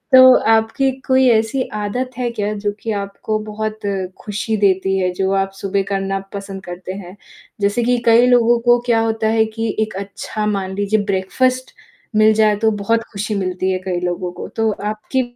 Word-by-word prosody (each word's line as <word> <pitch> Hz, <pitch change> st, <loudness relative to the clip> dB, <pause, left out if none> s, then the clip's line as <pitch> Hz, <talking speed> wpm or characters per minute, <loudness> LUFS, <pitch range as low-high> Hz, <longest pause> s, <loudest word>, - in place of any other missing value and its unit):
तो 255 Hz, 0 st, +9 dB, 0.2 s
आपकी 225 Hz, +5 st, +2 dB, 0.2 s
कोई 260 Hz, 0 st, +4 dB
ऐसी 225 Hz, +3 st, +1 dB
आदत 245 Hz, +5 st, -2 dB
है 250 Hz, -1 st, -1 dB
क्या 210 Hz, -2 st, -2 dB
जो 205 Hz, -, +2 dB
कि 225 Hz, -, -4 dB
आपको 200 Hz, +1 st, -3 dB
बहुत 215 Hz, 0 st, -4 dB, 0.4 s
खुशी 215 Hz, +1 st, -2 dB
देती 190 Hz, -1 st, +2 dB
है 185 Hz, -1 st, +1 dB
जो 190 Hz, +1 st, -1 dB
आप 195 Hz, 0 st, 0 dB
सुबह 195 Hz, 0 st, 0 dB
करना 195 Hz, 0 st, -1 dB
पसंद 195 Hz, -1 st, -7 dB
करते 180 Hz, +1 st, -7 dB
हैं? 190 Hz, -1 st, -9 dB, 0.5 s
जैसे 205 Hz, +4 st, +1 dB
कि 245 Hz, +1 st, +2 dB
कई 230 Hz, +1 st, +6 dB
लोगों 240 Hz, -1 st, +4 dB
को 240 Hz, 0 st, +6 dB
क्या 235 Hz, -2 st, +3 dB
होता 220 Hz, -1 st, 0 dB
है 220 Hz, -, +4 dB
कि 225 Hz, -1 st, -1 dB
एक 215 Hz, -2 st, -1 dB
अच्छा 210 Hz, +2 st, -5 dB
मान 195 Hz, -2 st, -2 dB
लीजिए 205 Hz, +2 st, +1 dB
ब्रेकफ़ास्ट 255 Hz, +7 st, 0 dB, 0.4 s
मिल 215 Hz, 0 st, +5 dB
जाए 215 Hz, -1 st, +3 dB
तो 220 Hz, +1 st, +2 dB
बहुत 220 Hz, +2 st, 0 dB
खुशी 210 Hz, +1 st, -3 dB
मिलती 185 Hz, -1 st, -1 dB
है 185 Hz, -, -1 dB
कई 185 Hz, -1 st, -3 dB
लोगों 180 Hz, 0 st, -2 dB
को, -, -, -7 dB
तो 225 Hz, -1 st, 0 dB
आपकी 215 Hz, +5 st, -2 dB
210 Hz, 185 wpm, -19 LUFS, 195-225 Hz, 0.5 s, तो